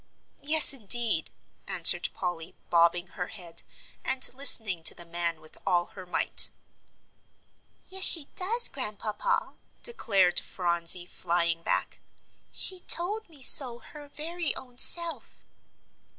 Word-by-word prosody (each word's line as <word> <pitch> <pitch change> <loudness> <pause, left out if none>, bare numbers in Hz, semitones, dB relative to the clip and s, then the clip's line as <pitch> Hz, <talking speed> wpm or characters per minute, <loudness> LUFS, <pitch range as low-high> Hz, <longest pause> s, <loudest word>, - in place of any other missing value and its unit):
"Yes, 310 0 +7
indeed," 225 - -2 0.4
answered - - +2
Polly, 175 -2 -9 0.2
bobbing 170 +1 -1
her 180 -2 -9
head, 175 -6 -9 0.4
and 265 -1 0
listening 220 -9 +1
to - - +1
the 175 - -13
man 170 -1 -7
with 155 0 -15
all 175 -1 -4
her 185 -2 -15
might. 180 - +2 1.4
"Yes, 380 0 -1
she 320 -5 +7
does, 445 +6 +1
Grandpapa," 215 -5 -7 0.3
declared 195 - -1
Phronsie, 175 0 -1
flying 170 -1 -5
back, - - -6 0.5
"she 375 -1 +2
told 370 +5 -3
me 290 -5 -11
so 255 -4 +9
her 290 +4 -17
very 330 +2 -6
own 250 -2 -13
self." 340 -1 +3
215 Hz, 120 wpm, -24 LUFS, -, 1.4 s, so